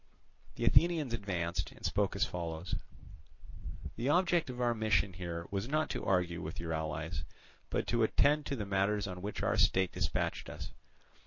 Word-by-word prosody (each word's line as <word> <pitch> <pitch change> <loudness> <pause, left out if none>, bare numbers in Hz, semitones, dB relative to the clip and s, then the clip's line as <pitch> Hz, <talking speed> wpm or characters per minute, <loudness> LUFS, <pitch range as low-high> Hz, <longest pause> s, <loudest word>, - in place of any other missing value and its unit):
The 115 - -1
Athenians 160 -2 +4
advanced, 90 -6 -2
and - - -10
spoke 100 0 +1
as 100 +4 +3
follows: 85 -3 -4 1.2
"The 120 +4 0
object 175 -1 +3
of 125 -1 -6
our 120 -1 +3
mission 110 -3 +2
here 85 -1 -4
was 100 +2 -1
not 155 +3 +1
to - - -3
argue 90 -3 +1
with 80 - -5
your 85 -1 -3
allies, 80 0 -3 0.5
but - - 0
to 120 0 +2
attend 145 +6 +3
to 140 - -1
the 105 -5 -3
matters 100 +1 +1
on 90 -2 -5
which 105 +2 -4
our - - +2
state 95 -1 +4
dispatched - - -1
us. - - -7
100 Hz, 170 wpm, -33 LUFS, 85-120 Hz, 1.2 s, Athenians